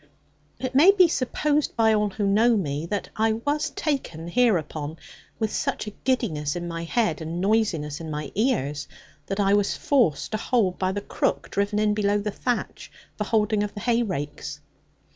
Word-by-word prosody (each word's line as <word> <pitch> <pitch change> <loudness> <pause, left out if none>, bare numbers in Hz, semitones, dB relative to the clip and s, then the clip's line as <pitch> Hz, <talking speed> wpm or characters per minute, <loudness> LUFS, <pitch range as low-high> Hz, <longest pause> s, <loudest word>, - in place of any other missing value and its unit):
It 260 0 -4
may 295 +8 +7
be 380 -3 +7
supposed 295 +1 0
by 225 -1 +4
all 210 -1 +2
who 205 +1 -2
know 220 +4 +4
me, 150 -3 -2
that 205 +2 -3
I 220 0 +3
was 290 +7 -1
taken 265 - -3
hereupon 165 - 0 0.4
with 220 -1 -1
such - - -1
a 210 - -6
giddiness 180 - -1
in 175 0 -4
my 165 0 -4
head 170 -4 0
and 165 +2 -4
noisiness 185 -8 0
in 160 - -6
my 150 -1 -4
ears, 150 - 0 0.4
that 195 +1 -3
I 200 0 +3
was 205 -1 +2
forced 235 - +1
to 215 - 0
hold 215 -5 +1
by 185 0 +1
the 205 +1 -3
crook - - -2
driven 200 +1 0
in 210 0 +2
below 205 -1 +1
the 205 0 -2
thatch 245 +3 -3 0.2
for 210 - -3
holding 210 -1 +1
of 210 0 -3
the 205 - -6
hay 240 +1 +2
rakes. 150 -6 -4
205 Hz, 180 wpm, -25 LUFS, 170-235 Hz, 0.4 s, may